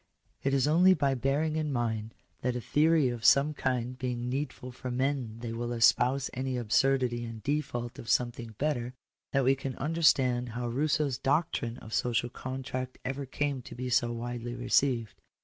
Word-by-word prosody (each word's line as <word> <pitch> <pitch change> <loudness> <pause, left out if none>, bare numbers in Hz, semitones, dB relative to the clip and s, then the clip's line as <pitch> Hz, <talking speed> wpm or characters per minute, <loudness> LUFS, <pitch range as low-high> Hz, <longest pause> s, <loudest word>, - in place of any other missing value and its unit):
§4 - - -1
It 135 - +2
is 135 0 +2
only 180 +5 +6
by 140 -3 +1
bearing 140 +5 0
in 155 -2 -1
mind 115 -3 -2 0.3
that 125 0 0
a - - -1
theory 155 +2 +3
of 120 -2 -5
some 140 +5 +5
kind 125 -2 -2
being 125 -1 -2
needful 130 -2 -4
for 130 +1 -7
men 130 -3 -1
they 115 -1 -4
will 120 +1 -3
espouse 125 +3 +3
any 130 0 -2
absurdity 120 +1 +2
in 115 -1 -6
de 145 +2 +1
fault 120 -4 -6
of 115 - -8
something 120 -2 0
better, 130 -4 -1 0.4
that 135 -1 +2
we 130 +2 +5
can 135 -1 -5
understand 130 -6 +2
how 120 0 -2
Rousseau's 140 +1 0
doctrine 135 -5 0
of 110 - -10
Social 120 0 +1
Contract 130 0 -5
ever 135 +1 -3
came 140 0 -2
to - - -10
be 125 +1 -4
so 120 -1 +3
widely 120 0 -4
received. 125 -2 +1
130 Hz, 180 wpm, -30 LUFS, 120-140 Hz, 0.4 s, only